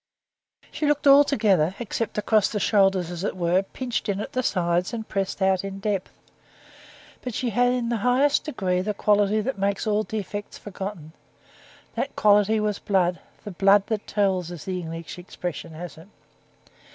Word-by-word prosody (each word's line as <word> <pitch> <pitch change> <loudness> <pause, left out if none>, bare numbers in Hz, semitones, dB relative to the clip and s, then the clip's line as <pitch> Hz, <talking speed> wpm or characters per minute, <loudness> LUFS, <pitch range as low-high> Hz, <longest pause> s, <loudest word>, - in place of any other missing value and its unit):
She 300 - -2
looked 295 +1 +1
altogether, 220 - +4
except 230 -1 -4
across 210 0 +2
the 210 - -2
shoulders, 195 -4 +2
as 175 0 -5
it 200 - -2
were, 175 +1 +2
pinched 240 +3 -4
in 200 -1 -1
at 210 - -5
the 255 - 0
sides 180 -2 0
and 220 -1 -6
pressed 195 0 -2
out 190 -1 +2
in 195 0 -5
depth. 200 -2 -3 1.0
But 250 -4 -5
she 245 -2 -1
had 245 +3 +3
in 245 -2 -1
the 235 - 0
highest 250 +6 +2
degree 185 -11 -1
the 210 +2 -2
quality 210 +1 +2
that 250 -1 -3
makes 200 +2 0
all 210 -1 +2
defects 210 -2 -5
forgotten: 190 -5 -7 0.8
that - - -3
quality 210 +1 +4
was 210 -1 -1
blood, 180 -3 +1 0.2
the 205 - -6
blood 195 +2 +4
that 215 -2 -2
tells, 190 -4 0
as 175 -4 -8
the 185 -1 -3
English 165 +1 -7
expression 175 -2 -6
has 165 0 -8
it. 165 - -15
200 Hz, 170 wpm, -24 LUFS, 185-220 Hz, 1.0 s, altogether